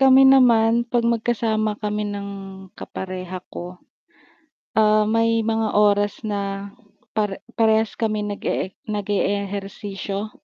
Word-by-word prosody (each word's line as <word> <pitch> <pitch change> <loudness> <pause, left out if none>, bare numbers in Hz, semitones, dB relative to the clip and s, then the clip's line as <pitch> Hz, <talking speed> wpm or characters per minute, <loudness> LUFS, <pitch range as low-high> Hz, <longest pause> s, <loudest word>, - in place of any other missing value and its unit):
Kami 270 0 +7
naman 235 -3 +5
'pag 240 0 +1
magkasama 220 -2 0
kami 210 0 -2
ng 200 0 -5 0.4
kapareha 185 -1 -7
ko. 180 +1 -7 1.0
Ah, 215 0 +5
may 230 0 +2
mga 225 -1 0
oras 205 0 +3
na 200 -2 -3 0.5
pare 210 -2 -1 0.2
parehas 220 -1 +2
kami 215 -2 0
nag-ee 205 -2 -2 0.2
nag-eehersisyo, 200 0 -3
210 Hz, 105 wpm, -22 LUFS, 200-225 Hz, 1.0 s, Kami